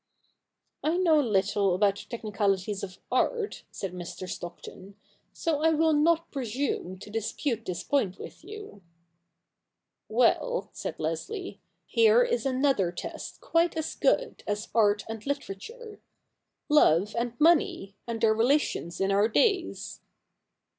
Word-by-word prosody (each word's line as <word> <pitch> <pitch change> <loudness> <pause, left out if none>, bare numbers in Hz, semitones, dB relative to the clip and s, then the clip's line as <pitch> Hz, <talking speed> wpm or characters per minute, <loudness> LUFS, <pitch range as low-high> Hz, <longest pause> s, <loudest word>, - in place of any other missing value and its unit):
* - - -59 0.3
I 320 +3 +1
know 335 -4 +4
little 200 -5 +2
about 200 +1 +2
the - - -10
technicalities 205 -3 -1
of 185 -1 -7
art,' 460 -4 0
said 190 -2 -6
Mr. 180 +1 -7
Stockton, 185 +2 -8 0.2
' - - -41
so 320 -4 -1
I 320 - +4
^vill 315 0 +3
not 330 +2 +2
presume 245 - -3
to 200 +2 -11
dispute 225 +2 -2
this 180 -2 -4
point 215 -10 0
with - - -10
you.' 415 - -10 0.7
' - - -58
Well,' 255 - +2
said - - -5
Leslie, 395 -4 -4
' - - -50
here 460 +1 +5
is 480 - 0
another 260 -9 +2
test 175 - -7
quite 335 0 +1
as 315 - -2
good - - 0
as 210 +2 -2
art 210 -2 +3
and 225 -1 -6
Hterature 285 - -6 0.4
— - - -55 0.2
love 210 - +4
and 235 0 -2
money, 300 - +3
and 230 -1 -3
their 220 -1 +4
relations 225 - +1
in 195 0 +1
our 200 +2 +4
days.' 225 - 0
230 Hz, 145 wpm, -28 LUFS, 200-320 Hz, 0.7 s, here